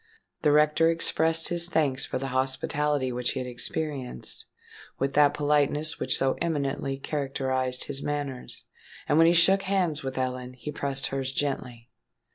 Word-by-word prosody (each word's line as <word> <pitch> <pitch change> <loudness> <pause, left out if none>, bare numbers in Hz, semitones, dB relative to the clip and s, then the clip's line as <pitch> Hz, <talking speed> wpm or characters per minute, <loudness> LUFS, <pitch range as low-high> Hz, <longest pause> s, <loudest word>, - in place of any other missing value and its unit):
The 150 - +3
rector 150 +2 +4
expressed 165 0 +3
his 175 0 +2
thanks 145 -6 +1
for - - -3
the 135 +1 -4
hospitality 130 +1 0
which 125 0 -1
he - - -3
had 130 - -4
experienced, 130 - -4 0.5
with 135 +1 -1
that 145 0 +4
politeness 150 +1 +1
which 130 - +1
so 135 0 +1
eminently 140 -4 -1
characterised 130 -3 -1
his 140 -1 -4
manners; 145 -3 -3 0.4
and 150 - +3
when 165 - +7
he 170 - +5
shook 190 +3 +5
hands 185 -6 0
with 135 -1 -5
Ellen, 125 -1 -3
he 130 +4 -7
pressed 140 -2 -2
hers 135 -1 -2
gently. 125 -4 -3
140 Hz, 155 wpm, -27 LUFS, 130-150 Hz, 0.5 s, when